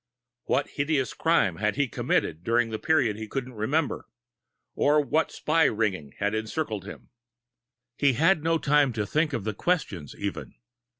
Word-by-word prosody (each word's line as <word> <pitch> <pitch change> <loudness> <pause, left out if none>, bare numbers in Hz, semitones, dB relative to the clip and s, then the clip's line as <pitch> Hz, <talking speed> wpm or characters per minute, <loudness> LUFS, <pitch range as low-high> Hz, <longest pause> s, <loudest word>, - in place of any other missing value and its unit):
What 140 +1 +1
hideous 140 -3 0
crime 160 - +2
could 105 0 0
he 140 - +2
have 130 - -5
committed 80 +3 -1
during 115 +2 +1
the 110 - -3
period 135 -10 +2
he 110 0 -6
couldn't 130 +2 -4
remember? 135 +8 -1 0.7
Or 150 +1 +3
what 155 +2 +1
spy 160 +1 +2
ring 95 - -1
had 100 +1 -1
encircled 110 -1 -3
him? 105 - -11 0.9
He 140 -2 +4
had 160 +5 +3
no 165 0 +2
time 145 -4 +3
to 110 -2 -2
think 155 +8 0
of 120 - -3
the 110 +1 -2
questions, 100 - -2
even. - - -5
130 Hz, 165 wpm, -26 LUFS, 105-150 Hz, 0.9 s, He